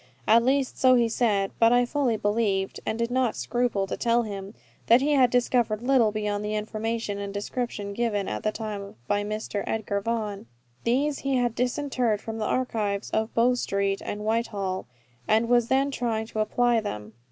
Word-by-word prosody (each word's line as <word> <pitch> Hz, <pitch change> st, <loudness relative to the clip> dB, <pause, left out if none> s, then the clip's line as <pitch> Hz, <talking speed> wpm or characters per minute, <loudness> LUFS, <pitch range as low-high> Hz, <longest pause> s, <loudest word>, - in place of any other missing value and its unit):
At 230 Hz, +2 st, +6 dB
least, 265 Hz, +1 st, +1 dB
so 255 Hz, -1 st, +6 dB
he 240 Hz, -1 st, +3 dB
said; 210 Hz, -4 st, +1 dB
but 230 Hz, 0 st, +6 dB
I 245 Hz, 0 st, +4 dB
fully 250 Hz, -3 st, 0 dB
believed, 205 Hz, -2 st, 0 dB
and 220 Hz, -, -1 dB
did 235 Hz, +1 st, -1 dB
not 255 Hz, -3 st, +1 dB
scruple 240 Hz, -5 st, 0 dB
to 195 Hz, -, -4 dB
tell 235 Hz, 0 st, +2 dB
him, 200 Hz, -1 st, -7 dB, 0.3 s
that 235 Hz, +2 st, +7 dB
he 285 Hz, +3 st, +1 dB
had 265 Hz, -4 st, +5 dB
discovered 240 Hz, -3 st, +1 dB
little 245 Hz, -4 st, +4 dB
beyond 210 Hz, -1 st, -2 dB
the 210 Hz, 0 st, -2 dB
information 215 Hz, 0 st, -3 dB
and 200 Hz, 0 st, -4 dB
description 205 Hz, 0 st, -4 dB
given 205 Hz, -3 st, -1 dB
at 105 Hz, -, -3 dB
the 215 Hz, -, 0 dB
time 210 Hz, -2 st, -6 dB
by 205 Hz, 0 st, +1 dB
Mr. 210 Hz, -1 st, -3 dB
Edgar 205 Hz, -2 st, -1 dB
Vaughan. 210 Hz, -, -3 dB, 0.4 s
These 275 Hz, +4 st, +1 dB
he 275 Hz, -1 st, -1 dB
had 245 Hz, -2 st, +1 dB
disinterred 250 Hz, -2 st, 0 dB
from 225 Hz, +1 st, -6 dB
the 215 Hz, -, -1 dB
archives 210 Hz, -6 st, -1 dB
of 220 Hz, 0 st, -1 dB
Bow 240 Hz, +2 st, +4 dB
Street 200 Hz, -5 st, -1 dB
and 210 Hz, +1 st, -5 dB
Whitehall, 205 Hz, -4 st, -1 dB, 0.4 s
and 220 Hz, +2 st, +3 dB
was 240 Hz, -1 st, +3 dB
then 270 Hz, +2 st, +2 dB
trying 230 Hz, -4 st, -1 dB
to 220 Hz, -, -6 dB
apply 240 Hz, +2 st, +2 dB
them. 105 Hz, -, -6 dB
225 Hz, 185 wpm, -26 LUFS, 205-245 Hz, 0.4 s, that